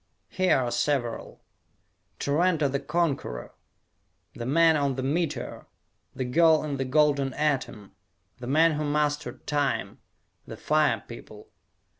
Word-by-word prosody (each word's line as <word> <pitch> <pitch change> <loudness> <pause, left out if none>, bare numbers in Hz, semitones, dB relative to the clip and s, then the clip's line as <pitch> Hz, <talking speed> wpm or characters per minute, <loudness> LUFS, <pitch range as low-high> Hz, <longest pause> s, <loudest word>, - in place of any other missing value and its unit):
Here 185 -4 +2
are 125 -2 -1
several: 120 -1 -2 0.8
"Tarranto 155 +1 +1
the 140 +1 -2
Conqueror," 140 - -2 0.8
"The 120 - -6
Man 165 +3 +4
on 140 -3 0
the 130 - -4
Meteor," 150 -1 -3 0.5
"The 130 - -3
Girl 160 +4 +4
in 145 -2 -3
the 135 - -2
Golden 140 -1 +2
Atom," 135 -9 -2 0.5
"The 120 - -7
Man 160 +5 +4
Who 155 0 -2
Mastered 150 0 -2
Time," 145 -3 -1 0.5
"The - - -8
Fire - - +1
People." - - -12
145 Hz, 125 wpm, -26 LUFS, 130-155 Hz, 0.8 s, Man